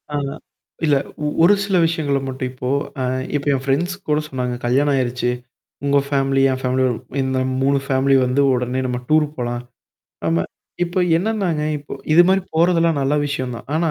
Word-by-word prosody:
ஆஹா. 140 Hz, -1 st, -2 dB, 0.5 s
இல்ல, 150 Hz, -2 st, +4 dB, 0.3 s
ஒ -, -, +1 dB, 0.2 s
ஒரு 185 Hz, +5 st, +7 dB
சில 195 Hz, -2 st, +1 dB
விஷயங்கள 145 Hz, -4 st, 0 dB
மட்டும் 130 Hz, -1 st, -3 dB
இப்போ 125 Hz, 0 st, -5 dB, 0.3 s
அ -, -, 0 dB, 0.3 s
இப்ப 140 Hz, -, -2 dB
என் 130 Hz, -, -3 dB
ஃப்ரெண்ட்ஸ் 155 Hz, +7 st, 0 dB
கூட 150 Hz, 0 st, +3 dB
சொன்னாங்க. 125 Hz, -3 st, -3 dB
கல்யாணம் 140 Hz, +4 st, +2 dB
ஆயிருச்சு. 125 Hz, -1 st, 0 dB, 0.6 s
உங்க 140 Hz, 0 st, +4 dB
ஃபேமிலி, 135 Hz, -1 st, +1 dB
என் 130 Hz, -, -2 dB
ஃபேமிலிய 130 Hz, 0 st, +1 dB, 0.4 s
இந்த 130 Hz, 0 st, 0 dB, 0.2 s
3 140 Hz, +1 st, +3 dB
ஃபேமிலி 135 Hz, 0 st, +2 dB
வந்து, 125 Hz, +3 st, +1 dB
உடனே 125 Hz, +1 st, -1 dB
நம்ம 125 Hz, -1 st, -2 dB
டூர் 155 Hz, 0 st, +4 dB
போலாம். 120 Hz, -1 st, -3 dB, 0.7 s
ஆமா. 85 Hz, +1 st, +2 dB, 0.4 s
இப்ப 175 Hz, +1 st, 0 dB
என்னன்னாங்க! 185 Hz, -5 st, 0 dB, 0.2 s
இப்போ 145 Hz, -, -9 dB, 0.2 s
இது 170 Hz, +3 st, +8 dB
மாரி 190 Hz, +1 st, +4 dB
போறதெல்லாம் 165 Hz, -2 st, +3 dB
நல்ல 135 Hz, +2 st, +1 dB
விஷயம் 130 Hz, -3 st, -3 dB
தான். 115 Hz, -, -11 dB
ஆனா 160 Hz, 0 st, +1 dB
140 Hz, 170 wpm, -20 LUFS, 130-160 Hz, 0.7 s, இது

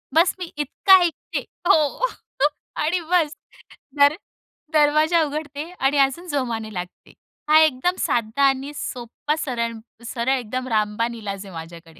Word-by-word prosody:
बस्स 335 Hz, +3 st, +4 dB
मी 355 Hz, -2 st, -6 dB
इतका 380 Hz, +6 st, +5 dB
ऐकते 340 Hz, -2 st, -2 dB, 0.3 s
हो. 315 Hz, -, +3 dB, 0.7 s
आणि 325 Hz, +4 st, 0 dB
बस्स 320 Hz, -4 st, +2 dB, 0.6 s
दर 285 Hz, +1 st, +6 dB, 0.6 s
दरवाजा 310 Hz, +2 st, +4 dB
उघडते. 300 Hz, +1 st, -5 dB
आणि 270 Hz, +2 st, +2 dB
अजून 275 Hz, +6 st, +1 dB
जोमाने 235 Hz, -8 st, -2 dB
लागते. 180 Hz, -1 st, -8 dB, 0.4 s
हा, 310 Hz, +1 st, +8 dB
एकदम 310 Hz, +4 st, +2 dB
साधा 235 Hz, +3 st, 0 dB
आणि 270 Hz, +2 st, -3 dB
सोप्पा 250 Hz, +4 st, -4 dB
सरळ, 240 Hz, -6 st, -2 dB, 0.3 s
सरळ 235 Hz, +1 st, -1 dB
एकदम 255 Hz, +2 st, -4 dB
रामबाण 220 Hz, +1 st, 0 dB
इलाज 200 Hz, -3 st, -6 dB
आहे 190 Hz, -, -11 dB
माझ्याकडे, 165 Hz, 0 st, -10 dB
275 Hz, 130 wpm, -22 LUFS, 230-310 Hz, 0.7 s, हा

